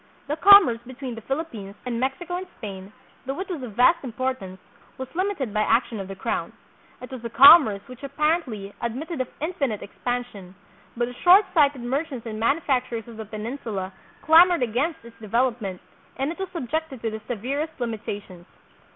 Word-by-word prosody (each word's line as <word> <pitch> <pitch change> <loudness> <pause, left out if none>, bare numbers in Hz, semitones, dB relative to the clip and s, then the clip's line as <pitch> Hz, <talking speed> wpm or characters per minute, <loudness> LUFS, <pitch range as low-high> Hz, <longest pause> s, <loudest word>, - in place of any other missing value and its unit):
The 295 - -1
com 400 +4 +9
merce 230 -3 -2
between 260 -1 -7
the 225 - -8
Philippines, 230 -7 -5
and 240 -2 -2
Mexico 270 +8 -2
and 370 +1 -6
Spain, 195 -3 -8 0.4
though 270 +4 -3
it 380 - -4
was 340 -6 -4
of 245 -4 -7
vast 250 +10 +4
importance, 245 -7 -4 0.4
was 260 - -5
limited 350 - -2
by 215 - +1
action 225 0 +1
of 195 - -5
the 195 - -7
crown. 190 - -3 0.5
It 250 - -9
was 255 -3 -8
a 235 - -4
commerce 265 -5 +8
which 255 0 -12
apparently 280 - -1
ad 235 -1 -2
mitted 315 +1 -4
of 255 - -3
infinite 285 - -2
expansion, 210 -5 -5 0.4
but 240 - +1
the 245 - -7
shortsighted 350 - +4
mer 265 +5 -1
chants 265 -8 -9
and 215 -1 -5
manufacturers 250 -3 0
of 230 -2 -11
the 220 - -6
Peninsula 215 -3 -5 0.3
clamored 335 -1 +6
against 245 +5 -2
its 235 -1 -15
development, 225 -4 -1 0.4
and 270 +3 -1
it 340 - -9
was 385 -1 -4
subjected 315 -5 -4
to 225 - -1
the 220 0 -6
severest 275 +8 -3
limitations. 205 -6 -6
250 Hz, 175 wpm, -24 LUFS, 220-305 Hz, 0.5 s, com